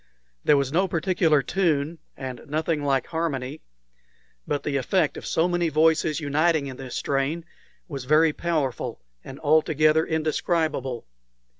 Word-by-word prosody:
There 150 - +5
was 140 -1 0
no 190 +3 +3
particular 165 -4 +2
tune, 160 -1 0 0.2
and 130 -2 -6
nothing 155 +1 -1
like 135 -2 +1
harmony; 150 -4 -3 0.9
but 145 - -1
the 140 -2 -1
effect 155 +4 +1
of - - -7
so 165 +2 +2
many 175 -1 0
voices 155 0 +2
uniting 155 +1 +1
in 130 -2 -7
this 130 -2 -7
strain 145 +4 -1 0.4
was 140 -5 -6
very 155 +3 +4
powerful 155 -8 -2 0.2
and 135 - -10
altogether 155 0 +3
indescribable. 155 -5 -1
155 Hz, 135 wpm, -25 LUFS, 140-165 Hz, 0.9 s, There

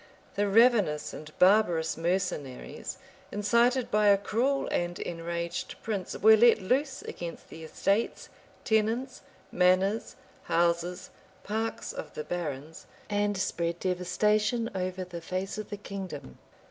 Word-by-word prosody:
The 205 0 +1
ravenous 205 -8 +4
and 155 0 -9
barbarous 180 -4 +4
mercenaries, 165 -6 -3 0.3
incited 235 +5 +2
by 210 0 +3
a 200 -1 +7
cruel 250 +7 0
and 175 0 -1
enraged 170 0 -4
prince 205 -4 -3
were 220 +1 +7
let 230 +1 +6
loose 260 +8 0
against 170 -1 -7
the 160 - -10
estates, 200 +7 -1 0.4
tenants, 225 +4 0 0.3
manors, 185 +4 +2 0.3
houses, 170 +2 0 0.3
parks 220 +2 -3
of - - -8
the 150 - -4
barons, 155 -2 -5 0.2
and 205 0 +1
spread 170 -3 -1
devastation 210 +5 +1
over 185 0 -3
the 175 -2 -8
face 185 +4 -4
of 215 - -6
the 205 - -5
kingdom. 190 - -7
190 Hz, 120 wpm, -29 LUFS, 170-215 Hz, 0.4 s, a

